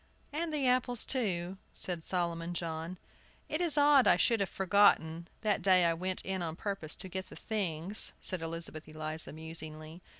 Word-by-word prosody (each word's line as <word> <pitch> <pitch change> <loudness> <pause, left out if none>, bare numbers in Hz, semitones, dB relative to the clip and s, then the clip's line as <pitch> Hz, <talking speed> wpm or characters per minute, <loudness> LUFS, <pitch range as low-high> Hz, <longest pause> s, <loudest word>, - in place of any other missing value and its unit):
"And 325 +2 -2
the 290 -4 0
apples, 250 -2 +5
too," 190 -7 -1 0.2
said 175 -3 -3
Solomon 170 -1 -2
John. 165 +1 -4 0.5
"It 310 - -2
is 325 -4 +1
odd 285 -2 +6
I - - +6
should 230 -3 +2
have 195 -3 -1
forgotten, 180 -4 +2
that 210 -1 +1
day 185 -2 +5
I 165 - +3
went 185 +2 -3
in 190 -1 -3
on 160 -2 -4
purpose 195 -5 -2
to - - -5
get 190 +1 -5
the - - -11
things," 195 -2 0
said 185 -3 +1
Elizabeth 165 -1 -6
Eliza, 155 +1 -1
musingly. 160 +1 -8
180 Hz, 170 wpm, -31 LUFS, 165-210 Hz, 0.5 s, odd